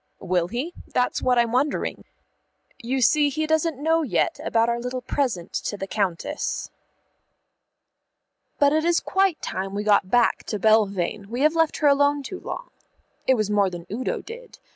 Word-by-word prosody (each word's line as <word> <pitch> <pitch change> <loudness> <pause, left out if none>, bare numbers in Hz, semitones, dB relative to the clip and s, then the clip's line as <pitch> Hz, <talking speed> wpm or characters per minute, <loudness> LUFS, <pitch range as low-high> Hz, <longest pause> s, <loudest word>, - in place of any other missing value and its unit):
"Will 180 -2 0
he? 255 - -4
That's 250 0 0
what 250 -1 +2
I'm 235 -1 +2
wondering. 275 +4 -1 0.8
You 255 +3 -1
see 295 +3 +4
he 310 +3 -2
doesn't 315 -1 +1
know 325 +3 +2
yet 290 - 0
about 230 0 +2
our 235 0 0
little 250 +1 -4
present 240 -12 -2
to 205 - -3
the 195 - -4
Countess." 195 -4 -2 1.9
But 285 0 +4
it 315 0 +2
is 340 0 +3
quite 385 -3 0
time 195 +1 -4
we 205 - -2
got 205 -3 +3
back 240 +2 +2
to 210 - -3
Belvane; 200 -2 +1
we 240 +3 -3
have 305 +2 +4
left 325 -2 +1
her 300 - +2
alone 285 0 +3
too 370 +7 -7
long. - - -7 0.6
It 260 - +5
was 215 -3 -1
more 200 -2 +3
than 175 -2 -8
Udo 245 +5 -2
did. 480 +2 -11
250 Hz, 170 wpm, -24 LUFS, 205-300 Hz, 1.9 s, It